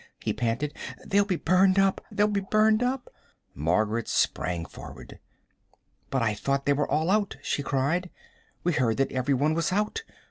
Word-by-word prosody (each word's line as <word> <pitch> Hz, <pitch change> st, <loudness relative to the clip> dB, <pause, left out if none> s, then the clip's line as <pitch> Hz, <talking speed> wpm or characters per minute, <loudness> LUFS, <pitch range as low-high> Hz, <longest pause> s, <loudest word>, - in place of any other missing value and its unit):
he -, -, -2 dB
panted. 125 Hz, +5 st, -2 dB, 0.3 s
"They'll 200 Hz, +1 st, +3 dB
be 195 Hz, -3 st, 0 dB
burned 185 Hz, +3 st, +3 dB
up 195 Hz, -1 st, +3 dB
they'll 205 Hz, -, +3 dB
be 205 Hz, -1 st, 0 dB
burned 215 Hz, +3 st, +3 dB
up!" 250 Hz, +1 st, -1 dB, 0.5 s
Margaret 105 Hz, -, 0 dB
sprang 85 Hz, -2 st, 0 dB
forward. -, -, -11 dB, 0.9 s
"But 135 Hz, -3 st, 0 dB
I 110 Hz, -2 st, +1 dB
thought 140 Hz, +6 st, -1 dB
they 145 Hz, -, +4 dB
were 145 Hz, +1 st, -1 dB
all 160 Hz, +4 st, +1 dB
out," 205 Hz, -5 st, +1 dB
she 145 Hz, -, -1 dB
cried. 145 Hz, +6 st, 0 dB, 0.5 s
"We 175 Hz, -, +1 dB
heard 125 Hz, -7 st, +1 dB
that 135 Hz, 0 st, +1 dB
every 130 Hz, +2 st, +1 dB
one 150 Hz, +4 st, +2 dB
was 165 Hz, +2 st, 0 dB
out. 210 Hz, -, 0 dB
150 Hz, 170 wpm, -27 LUFS, 130-195 Hz, 0.9 s, they